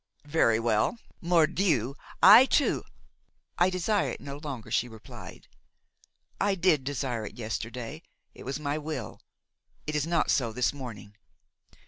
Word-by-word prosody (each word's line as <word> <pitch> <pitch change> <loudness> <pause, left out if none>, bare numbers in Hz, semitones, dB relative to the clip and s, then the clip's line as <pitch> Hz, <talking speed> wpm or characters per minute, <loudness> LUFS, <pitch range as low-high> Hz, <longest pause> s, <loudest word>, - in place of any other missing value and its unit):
Very 145 -7 +3
well! 115 - +1 0.2
Mordieu! 165 - +2 0.3
I 260 - +10
too–" 285 - +2 0.8
"I 175 +1 +5
desire 185 +3 0
it - - -6
no 140 0 -7
longer," 140 -7 -7
she 125 - +1
replied. 110 -2 -12 0.9
"I 200 0 +2
did 170 -6 +2
desire 130 -4 -3
it - - -12
yesterday, 115 +5 -5 0.3
it - - -14
was 135 +3 -4
my 150 0 -2
will; 150 -7 -6 0.6
it 150 - -3
is 150 +1 0
not 170 -1 +1
so 120 -5 +1
this 125 +4 0
morning. 115 -7 -9
145 Hz, 135 wpm, -28 LUFS, 120-165 Hz, 0.9 s, I